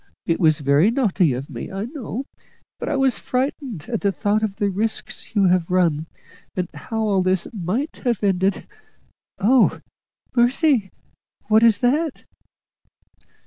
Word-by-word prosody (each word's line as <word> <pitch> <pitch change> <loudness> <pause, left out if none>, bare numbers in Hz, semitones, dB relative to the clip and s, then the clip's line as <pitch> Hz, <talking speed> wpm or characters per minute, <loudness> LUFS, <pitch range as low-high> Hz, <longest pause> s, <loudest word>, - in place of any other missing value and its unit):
It 165 - 0
was 155 -4 +3
very 145 +7 +4
naughty 210 - +2
of 130 +3 -4
me, 120 -5 -7
I 195 +2 -3
know, 260 -1 -6 0.5
but - - -3
I 300 - 0
was 270 -2 +2
frightened 255 - -3
at 230 -3 -2
the 200 - +2
thought 205 +2 0
of 210 -3 -2
the 200 0 0
risks 220 +3 -3
you 200 - +4
have 180 -2 +2
run, 165 -4 +1 0.5
and 180 -1 -1
how 220 +9 -4
all 200 -3 +2
this 185 -1 +1
might 215 - -3
have 235 -6 -1
ended. 190 0 +1 0.7
Oh, 240 +5 +3 0.6
mercy! 245 - +3 0.6
what 220 +1 +5
is 230 -1 +4
that?" 290 +5 0
205 Hz, 145 wpm, -22 LUFS, 180-245 Hz, 0.7 s, what